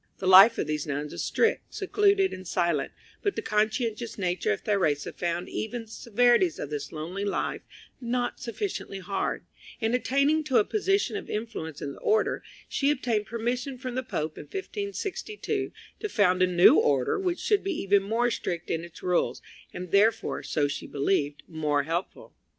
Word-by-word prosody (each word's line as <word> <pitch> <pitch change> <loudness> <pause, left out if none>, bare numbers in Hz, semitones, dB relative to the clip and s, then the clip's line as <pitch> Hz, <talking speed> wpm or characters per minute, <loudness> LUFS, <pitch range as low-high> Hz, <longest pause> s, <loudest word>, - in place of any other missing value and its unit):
The - - -6
life 195 +5 +9
of - - 0
these 150 0 -2
nuns 145 +1 -3
was - - -4
strict, 455 - 0
secluded, 395 -1 +2
and 185 -1 -8
silent; 170 -5 0 0.3
but 405 - 0
the - - -3
conscientious 220 +2 -1
nature 180 - 0
of 100 - -2
Theresa 160 -9 0
found 175 0 -2
even 230 +2 -4
the 225 - -19
severities 230 -5 +2
of 145 - -6
this 145 -1 -4
lonely 170 +5 -5
life 200 - -2 0.4
not 245 0 -1
sufficiently 210 -4 -4
hard, 190 +1 -3 0.3
and 225 0 0
attaining 280 +5 +2
to 265 -5 +2
a 215 - +6
position 390 - +1
of - - -5
influence 210 -9 -5
in 140 - -4
the - - -13
order 435 +1 +1 0.3
she 280 - +1
obtained 235 -7 0
permission 245 +4 -2
from 255 0 -5
the 255 - -1
Pope 155 -11 -4
in - - -8
1562 400 +1 -4 0.3
to 425 - -3
found 185 - +3
a 185 - +5
new 175 -1 +6
order 135 - +2
which 360 -2 0
should 415 -2 +2
be 385 0 -1
even 200 0 +3
more 230 +4 +1
strict 175 -6 -3
in 165 0 -1
its 170 0 -12
rules, 180 -1 +1 0.3
and 180 -1 -7
therefore, 210 +3 +3
so 145 -2 0
she 145 - -5
believed, 145 0 0
more 150 -3 0
helpful. 165 +5 -4
210 Hz, 175 wpm, -27 LUFS, 170-255 Hz, 0.4 s, life